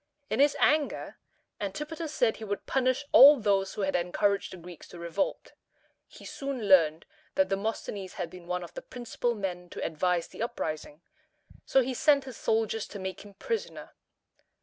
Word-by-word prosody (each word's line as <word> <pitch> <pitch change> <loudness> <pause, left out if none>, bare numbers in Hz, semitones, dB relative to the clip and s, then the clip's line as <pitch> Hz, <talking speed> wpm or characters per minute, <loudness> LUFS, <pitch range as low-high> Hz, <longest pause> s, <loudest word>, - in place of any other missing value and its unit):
In 220 - 0
his 285 +1 +4
anger, 300 -1 +1 0.4
Antipater 300 - -4
said 245 -7 +1
he 220 - -9
would 205 -1 -4
punish 255 +1 +1
all 285 +1 +9
those 195 -3 +1
who - - -3
had 190 0 0
encouraged 195 +3 0
the 185 - -8
Greeks 175 -1 -12
to 175 - -12
revolt. 170 - -3 0.5
He - - -14
soon 275 -6 -4
learned 165 -4 +5 0.3
that 285 0 +3
Demosthenes 195 -1 -3
had 175 -3 -5
been 180 -2 -12
one 180 0 -2
of 170 - -10
the - - -6
principal 240 -1 -3
men 180 -3 -4
to - - -5
advise 170 +2 0
the - - -10
uprising, 160 -9 -4 0.6
so 265 - +4
he 255 +1 -2
sent 280 +2 +4
his 260 -3 -9
soldiers 225 -1 0
to 205 - -8
make 190 -1 -5
him 205 -1 -14
prisoner. 460 - -4
205 Hz, 170 wpm, -29 LUFS, 180-260 Hz, 0.6 s, all